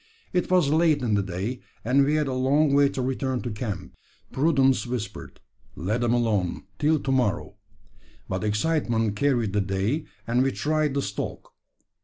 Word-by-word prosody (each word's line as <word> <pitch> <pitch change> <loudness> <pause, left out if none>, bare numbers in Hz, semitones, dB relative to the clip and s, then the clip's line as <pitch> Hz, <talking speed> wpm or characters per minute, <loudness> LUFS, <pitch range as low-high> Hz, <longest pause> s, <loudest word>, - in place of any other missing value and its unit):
It 180 - 0
was 180 -6 +4
late 155 -3 +3
in 115 -3 +1
the 100 - +3
day, 95 +6 -4 0.3
and 135 +4 +4
we 145 +2 +2
had 155 -1 +2
a 130 - -2
long 140 +3 +2
way 140 0 +5
to 130 - -3
return 130 0 -2
to 120 - -3
camp. 105 -1 -5 0.4
Prudence 135 -5 +2
whispered, 120 -3 -5 0.4
"Let 105 +9 -2
them 120 0 +2
alone 105 -7 0 0.2
till 155 +1 +3
to 135 - -2
morrow," 105 -5 0 0.7
but 95 +1 -3
excitement 115 -1 0
carried 120 -4 +1
the 105 - +2
day, 100 +10 -1 0.2
and 120 +2 +1
we 135 0 +1
tried 155 -2 0
the 140 - 0
stalk. 100 +1 -5
125 Hz, 170 wpm, -25 LUFS, 105-145 Hz, 0.7 s, way